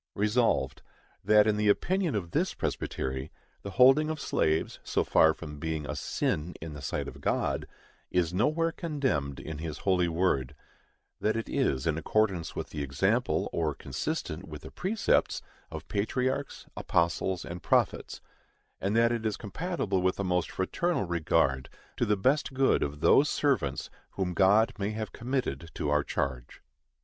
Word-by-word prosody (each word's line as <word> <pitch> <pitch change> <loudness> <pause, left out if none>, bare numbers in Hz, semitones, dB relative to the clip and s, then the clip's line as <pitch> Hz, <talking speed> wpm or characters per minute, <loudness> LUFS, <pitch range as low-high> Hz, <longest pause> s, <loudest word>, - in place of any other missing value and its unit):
Resolved, 105 - +1 0.4
That 105 +1 +6
in 105 -1 +2
the 105 0 +1
opinion 180 - +1
of 85 -5 -3
this - - 0
Presbytery, 65 +2 -3 0.3
the 100 - -6
holding 135 +5 +6
of 155 -1 -3
slaves, 80 - 0
so - - 0
far 80 - +5
from 75 -1 -8
being 80 -1 -3
a - - -4
SIN 80 +4 -2
in 80 -1 -7
the 75 - -8
sight 70 - -3
of - - -9
God, - - 0 0.4
is 90 -1 +1
nowhere 155 - +2
condemned 135 - -2
in 80 -2 -6
his 80 -3 -5
holy 90 -3 +3
word; 80 -6 0 0.6
that 110 - +1
it 115 - -3
is 65 -1 0
in 80 0 +1
accordance 95 -2 0
with - - -5
the 75 - -4
example, 70 -1 +1
or 80 -4 0
consistent 65 -1 -4
with - - -9
the - - -9
precepts, 200 +3 +1 0.3
of - - -8
patriarchs, 130 +7 -1
apostles 85 +1 0
and 85 +1 -7
prophets, - - +1 0.6
and 100 +3 -1
that 115 +1 +4
it 115 -2 -1
is 110 -2 -1
compatible 105 - -2
with 95 0 +2
the 100 - -3
most 90 -2 0
fraternal 150 - -1
regard 80 -6 +1 0.3
to - - +1
the 105 0 +2
best 135 +6 +1
good 135 0 +3
of 75 +1 -3
those 145 - +5
servants 125 - 0 0.2
whom 90 -2 -2
God 100 +5 +4
may 100 +1 0
have 110 -1 -4
committed 120 - -2
to 75 - -1
our 75 -1 +3
charge. 65 -4 -4
95 Hz, 160 wpm, -29 LUFS, 80-120 Hz, 0.6 s, That